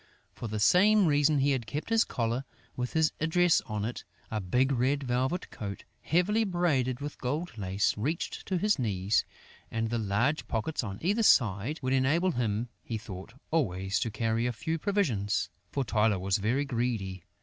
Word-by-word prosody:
For 120 - -6
the 110 0 -3
same 195 - +5
reason, 145 -1 +3
he 140 +1 +3
had 125 -5 -1
kept 145 - -4
his 225 0 +4
collar, 120 +1 -2 0.3
with 125 0 -3
his 160 -1 +3
address 170 +2 +3
on 105 -2 -2
it. 120 - -5 0.3
A 110 -1 -1
big 125 +9 +1
red 135 +3 +1
velvet 130 +7 -1
coat, 100 -2 -6 0.2
heavily 200 +7 +2
braided 145 - 0
with 145 +1 -6
gold 150 +5 -3
lace, 100 -1 0
reached 150 - -3
to 185 - 0
his 210 -2 +2
knees; 100 -3 +1 0.5
and 115 0 -2
the 120 - 0
large 115 +9 0
pockets 120 +6 -2
on 100 -3 -5
either 205 +6 +2
side 120 - +3
would 130 +1 +1
enable 150 +8 +2
him, 115 -4 -1
he 115 - -4
thought, 105 -1 -9 0.2
always 95 - 0
to 115 - -1
carry 115 +2 0
a 125 - -1
few 160 +8 -3
provisions; 120 - 0 0.2
for 140 - 0
Tylô 110 -4 +2
was 95 0 +1
very 120 +8 +1
greedy. 115 -8 -2
125 Hz, 175 wpm, -29 LUFS, 110-155 Hz, 0.5 s, same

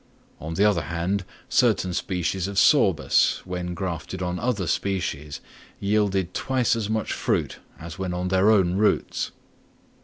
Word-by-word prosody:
On 80 +1 -5
the 100 - +3
other 100 -5 +3
hand, 90 +3 -2 0.2
certain 90 -1 +2
species 90 +1 -2
of 100 -1 -6
Sorbus, 90 - +3
when 90 -1 -4
grafted 90 0 -4
on 90 0 -2
other 115 -6 -1
species, 75 -5 -2 0.4
yielded 100 -3 0
twice 130 -3 +1
as 110 -3 -3
much 110 0 -1
fruit - - -1 0.2
as 85 +3 -9
when 95 -1 -2
on 90 +1 -2
their 95 +2 +3
own 95 -5 +4
roots. 105 +1 +1
95 Hz, 145 wpm, -24 LUFS, 90-100 Hz, 0.4 s, own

